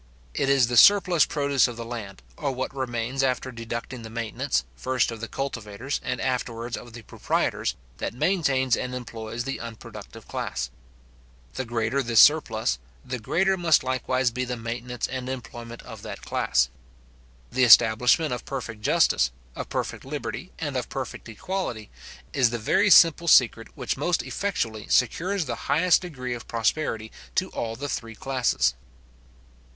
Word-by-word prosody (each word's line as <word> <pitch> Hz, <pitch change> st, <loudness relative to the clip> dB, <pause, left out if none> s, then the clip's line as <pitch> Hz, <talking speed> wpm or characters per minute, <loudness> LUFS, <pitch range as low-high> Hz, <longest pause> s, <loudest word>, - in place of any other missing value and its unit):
It 135 Hz, -, 0 dB
is 135 Hz, -3 st, +5 dB
the 120 Hz, 0 st, -1 dB
surplus 185 Hz, -, +7 dB
produce 140 Hz, -3 st, +2 dB
of 120 Hz, -2 st, -7 dB
the 115 Hz, -, -5 dB
land, 105 Hz, -, -7 dB
or 140 Hz, -, -2 dB
what 130 Hz, +1 st, -4 dB
remains 125 Hz, 0 st, -2 dB
after 130 Hz, 0 st, 0 dB
deducting 115 Hz, +1 st, -6 dB
the 110 Hz, -, -8 dB
maintenance, 110 Hz, -, -1 dB
first 130 Hz, -, 0 dB
of 115 Hz, -1 st, -7 dB
the 115 Hz, -, -4 dB
cultivators, 125 Hz, -1 st, -4 dB
and -, -, -2 dB
afterwards 120 Hz, -2 st, -2 dB
of 120 Hz, -2 st, -10 dB
the 115 Hz, -1 st, -10 dB
proprietors, -, -, -1 dB, 0.2 s
that -, -, -4 dB
maintains 135 Hz, -6 st, +2 dB
and 125 Hz, 0 st, -4 dB
employs 115 Hz, -1 st, -5 dB
the 135 Hz, +1 st, -4 dB
unproductive 115 Hz, -2 st, -10 dB
class. -, -, -3 dB, 0.8 s
The 130 Hz, -, -3 dB
greater 120 Hz, +3 st, 0 dB
this 115 Hz, -3 st, +3 dB
surplus, 110 Hz, -, +4 dB, 0.3 s
the 125 Hz, -1 st, -4 dB
greater 190 Hz, -, +1 dB
must 170 Hz, -3 st, +4 dB
likewise 130 Hz, -1 st, 0 dB
be 125 Hz, +2 st, -2 dB
the 125 Hz, -1 st, -3 dB
maintenance 120 Hz, +1 st, -4 dB
and 130 Hz, 0 st, -4 dB
employment 120 Hz, -2 st, -7 dB
of -, -, -10 dB
that -, -, -8 dB
class. -, -, +1 dB, 0.8 s
The 130 Hz, +1 st, +2 dB
establishment 125 Hz, +5 st, +6 dB
of 120 Hz, -, -4 dB
perfect 115 Hz, -5 st, -6 dB
justice, 65 Hz, -9 st, +3 dB, 0.3 s
of -, -, -6 dB
perfect -, -, -3 dB
liberty, -, -, -5 dB
and -, -, -4 dB
of -, -, -2 dB
perfect -, -, -6 dB
equality, 115 Hz, -, -4 dB, 0.4 s
is 125 Hz, -3 st, +4 dB
the 120 Hz, -, -2 dB
very 200 Hz, -, +2 dB
simple 170 Hz, -2 st, +7 dB
secret 115 Hz, -6 st, +5 dB
which 125 Hz, -1 st, -2 dB
most 175 Hz, +6 st, 0 dB
effectually 115 Hz, -, -3 dB
secures 175 Hz, -, +1 dB
the 125 Hz, -, -3 dB, 0.2 s
highest 175 Hz, +3 st, +4 dB
degree 130 Hz, -9 st, -5 dB
of 120 Hz, -2 st, -8 dB
prosperity 115 Hz, -1 st, -1 dB, 0.2 s
to 185 Hz, 0 st, +1 dB
all 115 Hz, -1 st, -4 dB
the 140 Hz, +5 st, -5 dB
three 115 Hz, -5 st, -4 dB
classes. 120 Hz, -, +1 dB
125 Hz, 155 wpm, -25 LUFS, 115-135 Hz, 0.8 s, surplus